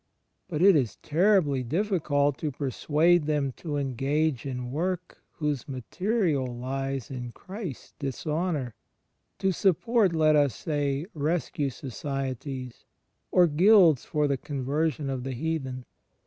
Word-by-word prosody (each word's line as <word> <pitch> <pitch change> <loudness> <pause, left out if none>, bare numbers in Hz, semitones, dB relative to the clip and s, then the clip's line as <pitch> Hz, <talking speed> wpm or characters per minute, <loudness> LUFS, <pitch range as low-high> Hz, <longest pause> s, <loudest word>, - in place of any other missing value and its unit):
But 170 -2 -1
it 195 -2 +7
is 130 -7 +1
terribly 165 -5 +3
difficult 145 - 0
to 155 - -1
persuade 150 +5 +2
them 145 -3 +1
to 150 -4 -3
engage 140 +1 0
in 125 -2 -4
work 175 +4 -3
whose 150 -4 -2
material 150 - -1
lies 135 +1 -4
in 125 -2 -5
Christ's 190 - -8
dishonour 150 -1 -2 0.3
— - - -49
to 195 -1 +1
support, 195 +2 +2
let 155 -1 +4
us 145 -3 +3
say. 145 -1 -1
Rescue 150 -2 -1
Societies, 130 -1 -5 0.5
or 180 - +5
guilds 170 - +5
for 150 -1 0
the 140 -1 0
conversion 145 +2 -2
of 130 -2 -3
the 135 0 -3
heathen. 135 -3 -3
145 Hz, 125 wpm, -27 LUFS, 135-165 Hz, 0.5 s, it